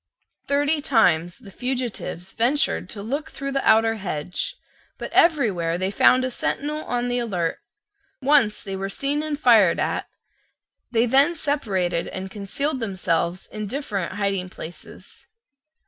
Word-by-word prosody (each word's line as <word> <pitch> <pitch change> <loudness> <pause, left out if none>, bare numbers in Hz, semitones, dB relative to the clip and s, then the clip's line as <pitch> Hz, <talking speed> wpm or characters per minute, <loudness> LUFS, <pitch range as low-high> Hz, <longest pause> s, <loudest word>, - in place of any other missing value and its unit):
Thirty 290 +2 +2
times 175 - +2
the 205 -5 -14
fugitives 245 -7 -3
ventured 250 +6 +1
to 200 -2 -6
look 280 +8 -3
through 275 0 -5
the 275 0 -1
outer 225 0 +4
hedge: 180 - -3 0.4
but - - -6
everywhere 205 - +3
they 185 +2 -1
found 255 +5 +4
a 255 - -3
sentinel 300 +5 -2
on 245 0 -1
the 245 0 0
alert: 185 -8 -2 0.6
once 265 -6 +3
they 195 -1 -5
were 195 +1 -3
seen 280 +8 -1
and 305 -2 -3
fired 225 - +5
at; - - -1 0.8
they 230 0 +2
then 275 +7 +4
separated 195 - -1
and 190 0 -6
concealed 260 +9 -2
themselves 185 -4 -1
in 215 -1 -6
different 210 - -3
hiding 195 -3 -1
places. 175 -1 -11
225 Hz, 140 wpm, -23 LUFS, 190-275 Hz, 0.8 s, fired